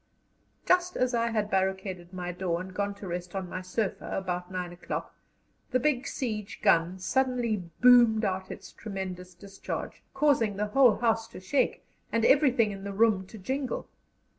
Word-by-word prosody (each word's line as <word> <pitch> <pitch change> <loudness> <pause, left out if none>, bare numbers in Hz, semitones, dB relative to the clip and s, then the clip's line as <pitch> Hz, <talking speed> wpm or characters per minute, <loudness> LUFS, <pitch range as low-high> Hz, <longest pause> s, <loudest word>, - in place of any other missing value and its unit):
Just 360 0 +2
as 255 0 +1
I 235 0 +2
had 215 -2 -1
barricaded 190 -2 -1
my 180 -1 -4
door 180 -1 -2
and 185 +1 -7
gone 200 +1 -2
to 200 -1 -9
rest 180 +1 -5
on 190 -1 -3
my 185 +1 -5
sofa 190 +3 -3
about 180 -1 -3
nine 180 -1 -4
o'clock, 175 - -5 0.6
the 255 - +2
big 270 -1 +1
siege 215 -5 -4
gun 170 +2 +3
suddenly 235 -1 0 0.2
boomed 240 -3 +7
out 190 -1 -2
its - - -9
tremendous 185 -3 -6
discharge, 195 +2 -6
causing 270 -8 +3
the 210 - 0
whole 260 -5 +6
house 225 -1 +1
to 230 - -10
shake 190 +10 0 0.3
and 230 0 +2
everything 260 -6 +4
in 195 -1 -8
the 200 0 -5
room 205 -3 +3
to 220 - -11
jingle. 260 +7 -3
200 Hz, 165 wpm, -28 LUFS, 185-235 Hz, 0.6 s, boomed